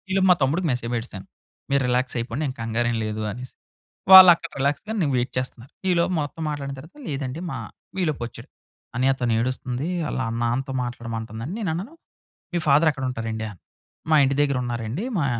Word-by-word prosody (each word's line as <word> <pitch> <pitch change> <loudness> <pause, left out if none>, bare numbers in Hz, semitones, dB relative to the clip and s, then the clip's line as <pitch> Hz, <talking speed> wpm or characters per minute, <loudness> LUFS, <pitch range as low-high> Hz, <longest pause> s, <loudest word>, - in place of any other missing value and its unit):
ఈలోపు 190 0 +3
మా - - +7
తమ్ముడికి 160 +7 +1
మెసేజ్ 120 -1 -2
బెట్టేసాను. 115 -5 -4 0.5
మీరు 140 0 +3
రిలాక్స్ 125 +1 0
అయిపోండి 115 +5 -3
ఎం 130 - -3
కంగారేం 115 +1 0
లేదు 110 0 -3
అనేసి. 125 +4 -8 0.6
వాళ్ళక్కడ 175 -3 +10
రిలాక్స్‌గా 145 +11 -1
నేను 145 -4 +1
వెయిట్ 125 +1 -1
చేస్తున్నారు. 125 -1 -4 0.2
ఈలోపు 175 +1 +2
మొత్తం 145 +3 -5
మాట్లాడిన 140 -2 -4
తర్వాత 160 - -14
లేదండి 135 0 -3
మా 135 - -4 0.5
ఈలోపొచ్చాడు. 130 -8 -4 0.5
"అన్నయ్య 130 +2 +3
తనెడుస్తుంది 125 +3 -1 0.2
ఆళ్ళ - - -3 0.2
నాన్నతో 130 +3 -1
మాట్లాడమంటుందని" 115 - -5
నేను 205 -6 -1
అన్నాను 195 - -5 0.6
మీ 175 - +1
ఫాదర్ 150 +3 +5
ఎక్కడుంటారండీ? 115 -5 -3
అను. 95 - -15 0.5
మా 160 - +5
ఇంటి 135 0 +2
దగ్గర 140 -2 +1
ఉన్నారండి 120 - -3
మా 155 - +1
130 Hz, 155 wpm, -24 LUFS, 120-155 Hz, 0.6 s, వాళ్ళక్కడ